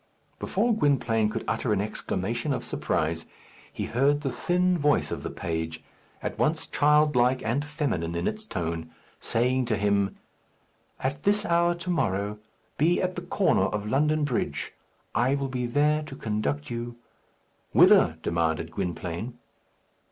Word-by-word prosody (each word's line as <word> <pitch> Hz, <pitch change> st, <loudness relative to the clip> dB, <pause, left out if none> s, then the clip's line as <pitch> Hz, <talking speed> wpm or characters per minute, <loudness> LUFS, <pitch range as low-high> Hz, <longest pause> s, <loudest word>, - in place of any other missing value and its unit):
Before 230 Hz, +5 st, +1 dB
Gwynplaine 120 Hz, -, +2 dB
could -, -, -3 dB
utter 120 Hz, -, 0 dB
an 100 Hz, -, +1 dB
exclamation 110 Hz, +5 st, -2 dB
of -, -, -3 dB
surprise, 80 Hz, -1 st, -1 dB, 0.4 s
he -, -, -4 dB
heard 140 Hz, +4 st, +2 dB
the 135 Hz, -3 st, -2 dB
thin 180 Hz, +4 st, +1 dB
voice 145 Hz, -, +2 dB
of -, -, -3 dB
the -, -, -4 dB
page, 80 Hz, -1 st, -4 dB, 0.4 s
at -, -, -4 dB
once 155 Hz, +1 st, +1 dB
childlike 145 Hz, -4 st, +3 dB
and 120 Hz, +6 st, 0 dB
feminine 140 Hz, -, -2 dB
in 85 Hz, -, -1 dB
its 215 Hz, 0 st, -4 dB
tone, 80 Hz, -, -3 dB, 0.3 s
saying 125 Hz, +2 st, +1 dB
to 115 Hz, -2 st, 0 dB
him, 100 Hz, -1 st, +1 dB, 0.8 s
"At 135 Hz, +2 st, -2 dB
this 205 Hz, +1 st, +2 dB
hour 170 Hz, 0 st, +3 dB
to 175 Hz, +1 st, -6 dB
morrow, 105 Hz, -, 0 dB, 0.4 s
be 165 Hz, +4 st, +3 dB
at 185 Hz, 0 st, -1 dB
the 175 Hz, -, -4 dB
corner 175 Hz, -, +2 dB
of 105 Hz, +1 st, -2 dB
London 150 Hz, +6 st, +2 dB
Bridge. 135 Hz, -5 st, -2 dB, 0.4 s
I 130 Hz, +4 st, +2 dB
will 140 Hz, -1 st, -2 dB
be 125 Hz, -2 st, -2 dB
there 150 Hz, +5 st, +2 dB
to 150 Hz, -3 st, -8 dB
conduct 105 Hz, -, -2 dB
you 120 Hz, 0 st, -4 dB, 0.4 s
" -, -, -41 dB
"Whither?" -, -, +6 dB
demanded 80 Hz, -1 st, 0 dB
Gwynplaine. 90 Hz, +6 st, -4 dB
125 Hz, 150 wpm, -27 LUFS, 100-150 Hz, 0.8 s, Whither